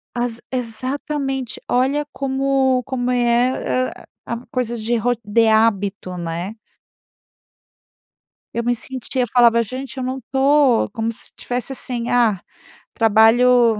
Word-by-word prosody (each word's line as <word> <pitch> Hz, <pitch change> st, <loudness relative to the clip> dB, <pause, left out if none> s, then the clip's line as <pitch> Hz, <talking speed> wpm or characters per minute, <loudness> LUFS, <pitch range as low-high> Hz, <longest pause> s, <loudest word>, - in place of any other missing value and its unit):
As 240 Hz, -1 st, -2 dB
exatamente. 260 Hz, +2 st, -3 dB
Olha 270 Hz, +4 st, +1 dB
como 265 Hz, -1 st, +1 dB
como 250 Hz, -1 st, -2 dB
é, 245 Hz, +1 st, +1 dB
a -, -, -14 dB, 0.2 s
a 235 Hz, -, -3 dB
coisas 240 Hz, -2 st, -2 dB
de 235 Hz, +2 st, 0 dB
ro 235 Hz, +2 st, +1 dB
de 225 Hz, +2 st, +3 dB
hábito, 205 Hz, -4 st, +1 dB
né? 170 Hz, +4 st, -4 dB, 2.0 s
Eu 235 Hz, -, -2 dB
me 240 Hz, +1 st, +1 dB
sentia, 255 Hz, +1 st, -2 dB
falava: 235 Hz, 0 st, +4 dB
"Gente 260 Hz, +4 st, -7 dB
eu 260 Hz, -, -3 dB
não 260 Hz, +1 st, -3 dB
tô". 270 Hz, -2 st, +4 dB
Como 225 Hz, 0 st, -2 dB
se 230 Hz, -, -10 dB
estivesse 245 Hz, +1 st, -3 dB
assim: 245 Hz, -2 st, -2 dB
"Ah, 230 Hz, -6 st, +3 dB, 0.5 s
trabalho, 225 Hz, +1 st, +4 dB
245 Hz, 120 wpm, -20 LUFS, 225-260 Hz, 2.0 s, falava